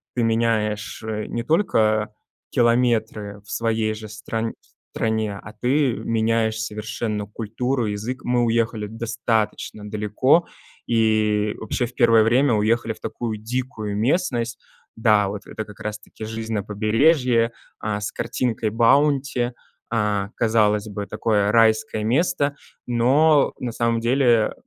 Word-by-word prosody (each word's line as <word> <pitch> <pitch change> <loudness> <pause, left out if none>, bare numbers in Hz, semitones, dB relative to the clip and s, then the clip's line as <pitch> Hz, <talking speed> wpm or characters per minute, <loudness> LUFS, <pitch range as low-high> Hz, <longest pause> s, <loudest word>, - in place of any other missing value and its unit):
ты 125 - +1
меняешь, 115 -2 0
э, 110 -1 -3
не 120 - -3
только 110 - +2 0.4
километры 115 -4 +1
в - - -18
своей 110 -1 0
же 110 0 -9
стран 110 +1 -4 0.4
стране, 110 -2 -1
а 110 - -11
ты 130 +1 +2
меняешь 110 -1 0
совершенно 105 0 -3
культуру, 115 +4 -2
язык. 110 +5 -4
Мы 120 0 +1
уехали 115 -2 0
достаточно 110 -1 -2
далеко 110 +10 +2 0.4
и 110 -2 +2
вообще 120 +3 -2
в 125 - -15
первое 115 -3 +5
время 125 +4 +3
уехали 110 +2 +1
в - - -18
такую 115 -3 -4
дикую 110 -2 -4
местность. 120 - 0 0.4
Да, 105 -3 +3
вот 100 +1 -7
это 110 - -5
как 105 -1 -14
раз 105 0 -4
таки 105 +1 -10
жизнь 110 +1 -5
на 105 - 0
побережье, 115 +3 +2 0.3
а, 105 -1 -2
с 105 - -4
картинкой 115 -2 -1
Баунти. 125 +2 +2 0.4
Э, 105 -2 0
казалось 110 -2 +2
бы, 105 -1 -5
такое 105 -2 +1
райское 110 -1 +3
место, 140 +3 +1 0.3
но 135 +5 +4
на 125 - -3
самом 115 0 0
деле 120 -2 +3
115 Hz, 130 wpm, -22 LUFS, 105-120 Hz, 0.4 s, первое